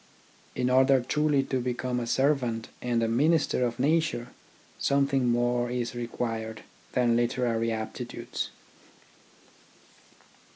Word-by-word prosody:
In 125 0 0
order 130 +1 +5
truly 150 +2 +1
to 130 -1 -1
become 125 0 -2
a 120 - -3
servant 125 -4 +1
and 120 -2 0
a - - +2
minister 140 +3 +2
of 120 -1 -1
nature 155 -3 +1 0.5
something 140 -2 +2
more 120 0 +1
is 120 -1 -2
required 115 -2 -4 0.3
than 120 -2 +3
literary 120 -1 +1
aptitudes. 110 -1 -4
125 Hz, 110 wpm, -28 LUFS, 120-135 Hz, 0.5 s, order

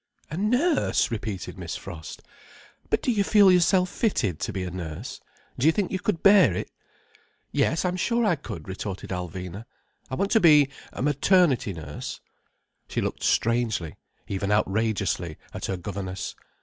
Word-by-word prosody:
"A - - -3
nurse!" 250 - +2
repeated 105 -4 -4
Miss - - -5
Frost. 80 -1 -8 0.7
"But - - +1
do 255 - +2
you 205 -3 +2
feel 200 -1 +6
yourself 180 +1 +4
fitted 115 - 0
to - - -2
be 95 - -3
a 90 - -4
nurse? 80 -4 -6 0.4
Do 135 - +3
you - - +7
think 195 +2 -1
you 190 - -1
could 180 -3 -2
bear 195 - +6
it?" - - -4 0.8
"Yes, 165 - +1
I'm 180 0 0
sure 235 +4 +1
I 185 -5 +3
could," 85 - -8
retorted 95 0 -5
Alvina. 90 +3 -5 0.4
"I 130 - -3
want 195 +8 -1
to 225 - +5
be 150 -6 +6 0.2
a - - -4
maternity 145 - +3
nurse—" 75 -3 -7 0.7
She - - -2
looked - - -3
strangely, 115 -8 +1 0.3
even 100 +1 -2
outrageously, 100 -5 0 0.2
at - - -5
her 95 - -2
governess. 95 0 -5
115 Hz, 160 wpm, -26 LUFS, -, 0.8 s, you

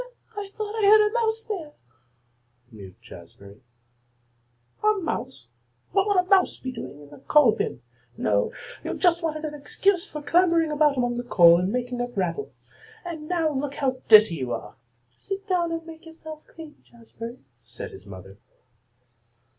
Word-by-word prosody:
"Well, 410 - -3
I 395 - -11
thought 430 +1 -4
I - - +5
heard 425 0 +7
a 420 - -5
mouse 450 -1 0
there," 345 -10 -6 1.0
mewed 100 -4 -12
Jazbury. 100 0 -14 1.2
"A 425 0 +5
mouse! 380 -6 -5 0.4
What 390 0 +2
would 405 -2 +2
a 360 - +5
mouse 380 -1 +3
be 260 - -6
doing 150 - -9
in 145 - -14
the 145 - -13
coal 295 -6 +5
bin? 125 - -3 0.3
No, 100 -1 +1 0.3
you - - -3
just 345 -2 +2
wanted 310 -1 -3
an 300 - -5
excuse 350 +5 0
for 300 -1 -7
clambering 335 0 +3
about 295 -2 +3
among 245 -1 0
the 245 - -3
coal 170 -7 +6
and 185 +2 -1
making 245 0 -3
it 245 -2 -4
rattle. 190 - -2 0.6
And 320 -3 -6
now 330 -3 +1
look 285 0 -3
how 260 -2 -1
dirty 215 -6 +7
you 130 -3 -4
are." - - -6 0.4
"Sit 395 +1 -6
down 350 -3 +1
and 330 0 -4
make 325 0 -12
yourself 315 -1 -11
clean, 320 -2 -13
Jazbury," 230 0 -10 0.2
said 115 0 -9
his 95 +2 -13
mother. 95 +1 -12
300 Hz, 170 wpm, -25 LUFS, 215-360 Hz, 1.2 s, heard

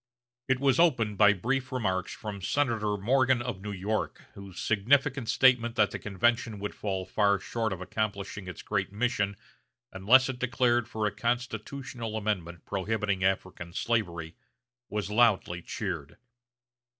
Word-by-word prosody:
It 130 0 +2
was 135 -2 +3
opened 115 - +3
by 105 -1 +7
brief 130 +6 -2
remarks 95 -8 -1
from 105 -3 -6
Senator 110 -2 0
Morgan 130 +4 +3
of 120 -6 -4
New 105 +1 -5
York, 100 +3 -3
whose 100 -2 -10
significant 125 +4 +2
statement 120 -3 +4
that - - +3
the - - -5
convention 115 +2 0
would 105 +1 -4
fall 95 -3 -3
far 100 +2 +2
short 110 +3 -2
of 95 -1 -4
accomplishing 100 -1 -3
its 90 - -8
great 95 -2 -1
mission 100 -2 0 0.6
unless 115 +8 +5
it 130 -2 -4
declared 120 -2 +2
for 110 -2 -2
a 105 - +1
Constitutional 120 0 -3
amendment 90 -6 -3
prohibiting 100 -1 -1
African 95 -2 -1
slavery, 85 -8 -1 0.5
was 105 -1 -3
loudly 105 -6 +3
cheered. 85 -6 -5
105 Hz, 140 wpm, -29 LUFS, 95-120 Hz, 0.6 s, by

